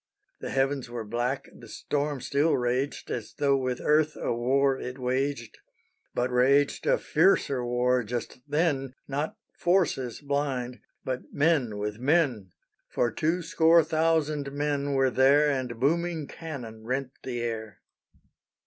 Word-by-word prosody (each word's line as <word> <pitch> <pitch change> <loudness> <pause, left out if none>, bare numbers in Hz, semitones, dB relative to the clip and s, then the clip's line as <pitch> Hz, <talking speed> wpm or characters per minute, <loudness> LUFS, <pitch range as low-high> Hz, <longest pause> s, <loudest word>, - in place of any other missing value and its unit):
The - - -5
heavens 135 -1 0
were 120 -1 -5
black, 120 +5 -2
the 115 - -13
storm 145 +4 -2
still 145 +5 +2
raged, 125 +3 -2
As 115 -3 -5
tho' 140 -1 +2
with 130 -2 -1
earth 155 0 +2
a - - -1
war 135 +3 +2
it 125 +1 -6
waged, 130 -1 -2 0.6
But 125 +1 0
raged 135 +3 +3
a - - +4
fiercer 155 -6 +2
war 125 +1 +1
just 120 +3 -5
then, 145 -4 0
Not 145 +3 -3 0.2
forces 170 -9 +1
blind, 140 -4 -2 0.3
but 130 -1 -4
men 145 -8 +1
with 105 +1 -4
men; 130 - +1 0.4
For 120 - 0
two 165 +9 0
score 165 +1 +5
thousand 155 -3 0
men 145 -1 -1
were 135 -1 +3
there; 140 +4 +4
And 125 -4 -3
booming 165 +3 0
cannon 125 -10 -8
rent 130 +2 -2
the 120 -2 -4
air. 110 -3 -5
135 Hz, 140 wpm, -27 LUFS, 125-150 Hz, 0.6 s, score